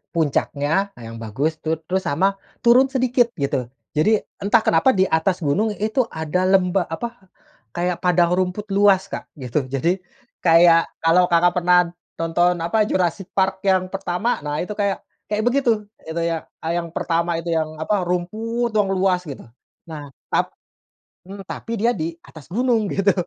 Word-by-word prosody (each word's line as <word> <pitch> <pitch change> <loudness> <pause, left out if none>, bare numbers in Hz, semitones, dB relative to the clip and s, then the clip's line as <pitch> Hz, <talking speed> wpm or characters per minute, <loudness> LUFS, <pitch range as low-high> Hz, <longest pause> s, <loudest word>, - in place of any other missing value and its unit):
puncaknya 160 +4 0
yang 115 -1 -9
bagus 140 +9 -2
tuh, 160 0 -1
terus 190 +1 -1
sama 195 +7 +1 0.2
turun 245 +3 +6
sedikit 255 -2 +2
gitu, 135 -4 -2 0.2
jadi 210 +8 +2 0.2
entah 220 +3 +3
kenapa 170 +10 +3
di 190 - +4
atas 170 +2 0
gunung 205 +9 +1
itu 220 +4 0
ada 165 +1 -1
lemba 185 -1 +2
apa 230 +4 -6 0.5
kayak 175 0 -1
padang 175 -1 +3
rumput 185 +2 0
luas 195 -1 +3
Kak, - - -6
gitu. 130 0 -3
Jadi 165 +8 0 0.4
kayak 165 0 +5 0.2
kalau 175 +2 +4
Kakak 175 +1 +4
pernah 180 0 +3 0.2
tonton 175 +2 +1
apa, 210 +5 +1
Jurassic 180 +1 -1
Park 190 0 +1
yang 185 -1 +2
pertama, 195 +4 -1
nah 145 +1 -4
itu 195 - -7
kayak 200 -2 -1 0.2
kayak 210 +1 -1
begitu, 245 -5 +2 0.2
itu 165 +1 -3
yang, 165 -1 -1 0.2
eee, 165 +1 -1
yang 170 - -5
pertama 170 0 0
itu 165 +1 -3
yang 155 -1 -1
apa, 190 +6 0
rumput 220 +7 -2
yang 210 -2 +2
luas 185 -1 +2
gitu. 140 - -7 0.4
Nah, 150 -3 -8 0.2
tap - - 0 0.7
mmm, 195 0 -8
tapi 230 +4 -5
dia 230 +3 +2
di 165 -5 -4
atas 155 -3 -14
gunung 230 +1 +1
gitu. 195 +1 +2
180 Hz, 160 wpm, -21 LUFS, 165-205 Hz, 0.7 s, turun